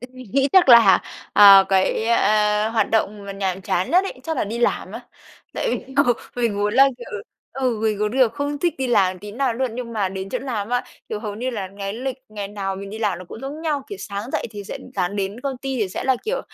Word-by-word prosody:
m 250 +2 -11 0.2
nghĩ 275 +1 +3
chắc 370 -6 +6
là, 235 -6 +8 0.3
à, 195 -2 +9
cái, 195 +3 +1
ơ, 210 -1 +2
hoạt 220 -3 +1
động 210 -2 0
mà 200 - -5
nhàm 190 -1 -2
chán 180 0 -1
nhất 365 +3 +4
ấy, 390 - -6
chắc 320 +3 -3
là - - 0
đi 220 +3 -5
làm 240 - 0
á. - - -6 0.5
Tại - - -1
vì 265 - -5
ừ, 245 - +4 0.2
mình 235 -4 0
muốn 205 +1 0
là, 270 +1 +7
kiểu 240 - -10 0.4
ừ, 255 -4 -1
mình 215 -2 +1
muốn 210 0 0
được 250 -1 +3
không 285 +2 -3
thích 345 +3 0
đi 265 - -1
làm 195 -6 +2
tí 205 +2 -9
nào 255 +1 0
luôn, 250 -1 -2
nhưng 240 -1 -6
mà 205 -4 0
đến 190 0 -6
chỗ - - -2
làm 225 -6 -4
á, 245 0 0 0.2
kiểu, 210 - -4
hầu 210 -2 -5
như 250 +5 -3
là 205 -6 -4
cái 195 0 -3
lịch 255 +3 -4
ngày 205 -2 -6
nào 195 -2 -4
mình 195 +1 -8
đi 215 - -7
làm 210 -5 -1
nó 185 - -9
cũng 225 - -9
giống 285 +4 -6
nhau, 300 -4 -1
kiểu, 410 - -7
sáng 205 - -6
dậy - - -1
thì 205 -2 -8
sẽ - - -6
ừ, - - -13
sáng 185 +1 -1
đến 200 +3 -3
công 275 -1 -3
ty 270 0 -4
thì 205 - 0
sẽ 185 - -5
là, 260 -1 +3
kiểu, - - -1
220 Hz, 260 wpm, -22 LUFS, 200-260 Hz, 0.5 s, à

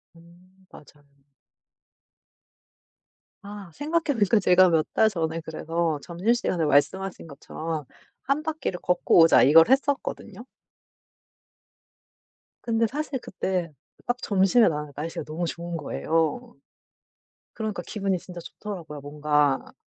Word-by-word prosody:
음 180 +3 -21
맞아요. 145 -1 -18 2.3
아 200 -2 -9
생각해 310 +1 -1
보니까 210 +1 +3
제가 185 -1 +5
몇 160 -2 +2
달 220 - +4
전에 165 -3 -3
그래서 160 0 -2
점심시간에 180 0 -1
말씀하신 180 +6 0
것처럼' 155 +1 -6 0.4
1 280 +3 0
바퀴를 305 - -3
걷고 180 -1 +2
오자.' 165 0 +7
이걸 160 - +7
했었거든요. 265 -5 -1 2.2
근데 230 -1 +1
사실 290 +1 -4
그때 185 -5 -3 0.3
딱 245 0 -1
점심에 200 +3 +3
나가니까 150 -2 -4
날씨가 165 +2 -5
너무 165 +3 -4
좋은 170 0 -5
거예요. 160 -1 -2 1.0
그러니까 215 -5 -4
기분이 195 -3 -2
진짜 175 +1 -10
좋더라구요. 165 -6 -8
뭔가 145 -1 0
175 Hz, 260 characters per minute, -25 LUFS, 160-210 Hz, 2.3 s, 오자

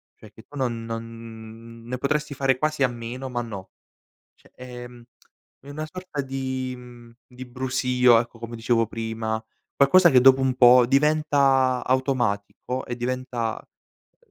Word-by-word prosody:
Cioè, 110 - -16
che 110 - -15
tu 145 - -13
non 120 -3 -2
non 115 0 -9
ne 125 +2 -5
potresti 150 +2 -1
fare 135 -1 +1
quasi 155 +1 -2
a - - +5
meno 120 +2 -7
ma 120 -1 -2
no, 100 -5 -8 0.7
cioè, - - -25
ehm, 125 -1 -10 0.6
è 140 - -13
una 155 +2 -5
sorta 185 -5 -6
di 130 -1 -4
mhmm, 120 -1 -14
di 125 0 -11
brusio 125 -1 +2
ecco, 120 -1 -8
come 115 0 -7
dicevo 115 0 +1
prima, 110 0 -4 0.3
qualcosa 170 +6 +5
che 130 -2 +6
dopo 135 +1 +6
un 130 -1 +1
po' 125 0 +7
diventa 140 -2 +2
automatico 125 -2 -1
e 120 - -4
diventa, 125 -2 -3 0.6
uhm, 475 - -33
125 Hz, 150 wpm, -24 LUFS, 115-135 Hz, 0.7 s, po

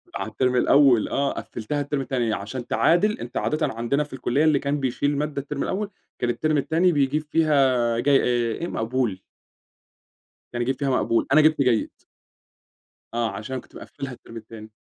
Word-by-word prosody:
على - - -3
التيرم 125 -1 0
الأول 130 -2 +4
آه 140 0 0
قفلتها 145 +6 -4
التيرم 145 -1 -2
التاني 120 -5 -1
عشان 120 +6 -5
تعادل 205 +6 +2
أنت 120 +1 -6
عادةً 155 +1 0
عندنا 120 +6 0
في 145 - -13
الكلية 135 +3 0
اللي 150 -3 +4
كان 145 0 -1
بيشيل 140 +2 -1
مادة 150 -1 -2
التيرم 145 0 -4
الأول 205 +2 -2 0.3
كان 120 - 0
التيرم 155 +4 0
التاني 165 +5 +2
بيجيب 145 0 +1
فيها 160 -2 +2 0.4
آآ - - -1
جي 140 +1 +4
آآ 120 -2 0
إيه 170 - -4
مقبول. 115 - -2 1.3
كان 120 - -2
يجيب 130 +2 -1
فيها 140 - 0
مقبول، 120 -3 +1
أنا 155 - +7
جِبت 155 -2 +3
جيد. 125 -4 +1 1.2
آه 115 -1 0
عشان 110 +5 -7
أنا 130 - -3
كنت - - -22
مقفّلها 135 -2 -8
التيرم 115 -1 -12
التاني. 110 0 -11
135 Hz, 180 wpm, -24 LUFS, 120-150 Hz, 1.3 s, أنا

